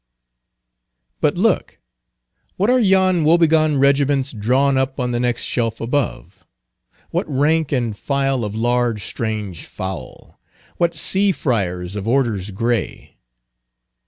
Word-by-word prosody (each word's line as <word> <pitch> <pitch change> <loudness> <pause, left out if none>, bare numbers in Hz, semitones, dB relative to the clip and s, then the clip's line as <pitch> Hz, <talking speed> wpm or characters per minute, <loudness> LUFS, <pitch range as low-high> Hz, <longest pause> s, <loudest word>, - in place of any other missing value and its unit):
But - - +1
look, - - 0 0.8
what 205 +6 +2
are 255 - +4
yon 190 -5 +3
wobegone 155 -2 +3
regiments 140 0 +2
drawn 130 +6 +1
up 130 +1 -1
on 125 -1 -1
the 120 - -1
next 120 -1 0
shelf 115 -2 -1
above? 125 +4 -3 0.7
what - - -2
rank 150 +2 +1
and 120 -6 -1
file 135 +1 -1
of 105 0 -4
large 120 -2 0
strange 105 -6 -4
fowl? 95 0 -8 0.4
what 170 -1 +1
sea 195 +5 +2
Friars 95 - -2
of 100 +1 -5
Orders 115 -6 0
Gray? 115 +2 -3
130 Hz, 120 wpm, -20 LUFS, 110-150 Hz, 0.8 s, are